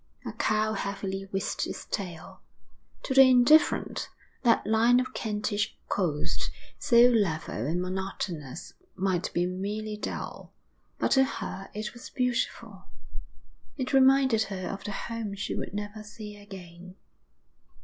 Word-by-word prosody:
A - - -3
cow 215 0 +1
heavily 195 -1 -3
whisked 195 -1 -2
its - - -6
tail. 175 -5 -6 0.6
To 265 - -1
the 270 - +9
indifferent, 255 +5 +4 0.3
that 235 -3 +3
line 225 +3 +4
of 255 - -3
Kentish 210 -2 -2
coast, 160 -7 -1 0.3
so 245 -3 +6
level 160 - 0
and 170 +3 0
monotonous, 180 -5 -4 0.2
might 185 -2 0
be 175 - +1
merely 210 +4 -3
dull, - - -6 0.4
but - - 0
to 265 - +6
her 195 -7 -5
it 210 0 -4
was 240 +1 -10
beautiful. 235 -5 -2 0.9
It 260 0 -3
reminded 265 -3 +5
her 185 -2 -5
of 195 - -5
the 205 - -4
home 220 0 -4
she 200 - -3
would - - -4
never 205 +1 -5
see 210 0 -9
again. 185 -3 -11
205 Hz, 130 wpm, -28 LUFS, 190-235 Hz, 0.9 s, the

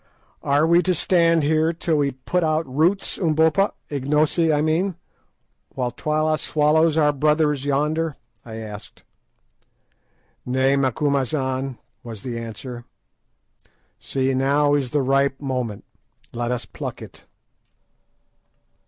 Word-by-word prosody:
"Are 145 +2 +2
we 170 +2 +4
to 185 0 0
stand 165 -1 +3
here 155 +2 +2
till 165 -1 -1
we 145 -1 +2
put 140 +7 -2
out 155 0 +1
roots, 160 +9 0
Umbopa—Ignosi, 155 -2 +1
I 150 - +2
mean—while 155 -6 -4
Twala 155 +4 0
swallows 155 +1 +2
our 150 -2 +3
brothers 150 -1 +1
yonder?" 150 +2 0 0.3
I 115 -2 -9
asked. 105 -2 -9 1.4
"Nay, 130 +2 +2
Macumazahn," 135 -1 -1 0.2
was 115 -4 -9
the 120 -3 -4
answer; 120 +1 -8 1.1
"see, 135 0 -1
now 140 +2 +2
is 140 -3 0
the 145 +2 0
ripe 135 +1 +1
moment: 125 -7 -4 0.5
let 120 0 -2
us 125 -1 -2
pluck - - -7
it." - - -14
145 Hz, 110 wpm, -22 LUFS, 130-160 Hz, 1.4 s, we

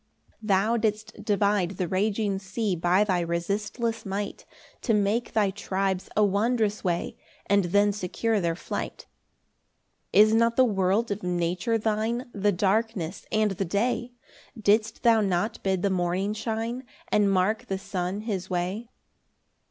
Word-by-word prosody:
12 - - -7
Thou 205 +4 +3
didst 215 -1 -2
divide 200 -3 +1
the 180 - -1
raging 200 +1 0
sea 190 +1 -2
By 175 +4 +3
thy 185 -4 +1
resistless 205 +7 -2
might, 200 0 -4 0.3
To 225 - +2
make 210 +4 0
thy 205 -3 +2
tribes 190 -1 -2
a 215 - +5
wondrous 215 +1 +1
way, 175 -3 -1 0.3
And 200 -1 +3
then 205 +3 +3
secure 210 +3 -1
their 170 -1 0
flight. - - -5 1.1
13 210 - +7
Is 215 - +1
not 230 +1 +3
the 260 - +5
world 205 +1 +1
of 200 - -2
nature 180 +6 0
thine, 225 +3 -1
The 205 0 +2
darkness 200 -2 -1
and 215 -1 +2
the 195 +1 -2
day? 240 +6 -1 0.5
Didst 215 +1 +2
thou 230 -2 +5
not 200 +2 -1
bid 190 -2 0
the 200 - +2
morning 185 +3 0
shine, 225 +3 -3 0.3
And 205 -1 +3
mark 195 +3 +1
the 195 - -2
sun 190 +1 -3
his 195 -5 -4
way? 185 +6 -2
205 Hz, 150 wpm, -26 LUFS, 190-220 Hz, 1.1 s, 13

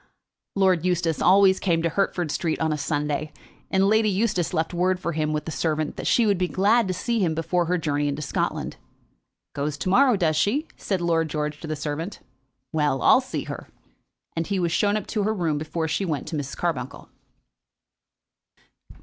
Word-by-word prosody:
Lord 190 -4 +3
George 170 -2 0
always 190 0 +5
came 165 -3 +1
to 170 - +2
Hertford 175 -2 -1
Street 160 +1 -1
on 160 -1 +1
a - - -2
Sunday, 150 +1 -2 0.4
and 190 0 +3
Lady 220 +1 +3
Eustace 195 -3 0
left 160 0 -1
word 180 +1 +1
for 170 - -2
him 155 -1 -1
with 150 -1 -2
the 160 - -4
servant 155 -1 -1
that - - -4
she 235 - +4
would 200 -4 +2
be 180 - +1
glad 210 +5 +3
to 185 - -1
see 235 +3 -1
him 170 -5 +1
before 170 +2 0
her 180 +2 +1
journey 145 -3 -1
into 145 +1 -2
Scotland. 140 - -2 0.8
"Goes 145 +1 -2
to 185 - -2
morrow, 250 +4 +5
does 160 -4 +1
she?" 265 - +1
said 190 -3 -2
Lord 165 -2 +1
George 150 0 -3
to 165 - -6
the 155 - -2
servant. 150 +5 -4 0.5
"Well; 150 -4 +1
I'll 260 - +6
see 260 - -4
her." - - -7 0.7
And 165 0 -2
he 200 - -1
was 175 -2 0
shown 205 +5 +2
up 210 - -4
to 215 - -2
her 215 +2 0
room 160 -6 0
before 160 +1 -3
he 160 +5 -1
went 155 -7 -3
to 165 - -4
Mrs. 140 -2 -4
Carbuncle. 135 -7 -3
170 Hz, 195 wpm, -24 LUFS, 155-195 Hz, 0.8 s, I'll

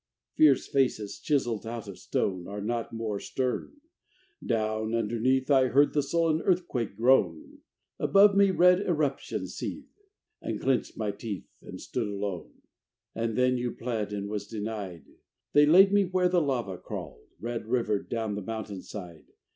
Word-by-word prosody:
Fierce 145 -4 +5
faces 125 -7 0
chiseled 120 -8 0
out 115 -2 -5
of 100 - -9
stone 90 -3 -2
Are 100 +1 -6
not 115 +3 -3
more 110 -3 -3
stern. 130 - -3 0.6
Down, 110 -1 -1
underneath, 120 +5 +1
I 130 -2 +5
heard 140 +3 +4
the 150 - +2
sullen 160 +2 +1
earthquake 170 - 0
groan; 105 -9 +2 0.4
Above 200 0 +5
me, 200 0 +5
red 180 0 +5
eruptions 155 -8 -2
seeth. - - -6 0.5
And - - -3
clenched 130 -2 0
my 105 -2 -1
teeth 100 -1 -7
and - - -9
stood 120 -4 -3
alone. 100 -4 -5 0.5
And 115 0 -2
then 125 0 +3
you 120 -1 -2
pled 115 -4 -3
and 100 -1 -4
was 105 -1 -4
denied. 105 -6 -5 0.5
They 145 0 +6
laid 190 +5 +7
me 205 -1 +4
where 180 0 +1
the 175 -1 +3
lava 120 - -2
crawled, 60 0 -8
Red 115 -1 -4
rivered, 115 -4 0
down 110 -3 -2
the 105 - -4
mountain 105 -2 -5
side. 90 -6 -9
115 Hz, 155 wpm, -28 LUFS, 105-140 Hz, 0.6 s, laid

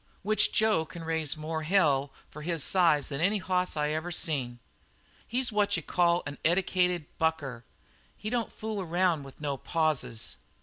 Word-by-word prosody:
Which 215 +2 +3
Jo 220 -7 +3
can 165 +1 -10
raise 160 -2 -1
more 160 +1 -4
hell 150 -5 +2 0.2
for 150 - -9
his 165 -1 0
size 165 -6 +4
than 140 0 -3
any 200 +5 +3
hoss 185 -3 -1
I 150 0 +1
ever 160 +3 -2
seen. 135 -8 0 0.7
"He's 250 +1 +1
what 210 -3 +2
you 165 - -5
call 175 +1 +2
an 145 0 -7
eddicated 180 -1 +1
bucker. 145 -7 -1 0.5
He 215 - -5
don't 240 -2 -1
fool 215 -2 -4
around 175 -2 +1
with 135 -1 -12
no 145 -2 -2
pauses. 140 - -1
165 Hz, 165 wpm, -29 LUFS, 150-185 Hz, 0.7 s, size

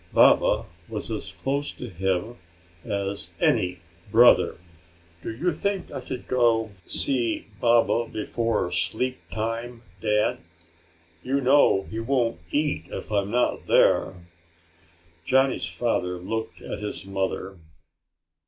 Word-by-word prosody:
Baba - - +5 0.2
was 110 0 -4
as 100 -7 -3
close 135 - -2
to 125 - -7
him 95 +4 -2 0.5
as 100 -1 -3
any 90 -1 +1 0.3
brother. 120 +3 +6 0.6
"Do - - -5
you 160 +11 0
think 195 +4 -2
I - - -5
could 125 0 -6
go 115 -3 +2 0.2
see 120 -4 0
Baba 120 0 +3
before 110 -3 -1
sleep 125 +8 -1
time, 115 +2 -4 0.2
Dad? 105 0 +1 0.8
You 135 +2 0
know 135 -7 +4
he 110 - -6
won't 115 -5 0
eat 145 - 0
if - - -7
I'm 100 -1 +1
not 125 +3 0
there." 95 - +4 1.1
Johnny's 130 +6 +2
father 90 -7 -1
looked 110 +5 -5
at - - -5
his 105 -1 -5
mother. 95 0 -3
115 Hz, 115 wpm, -25 LUFS, 100-125 Hz, 1.1 s, brother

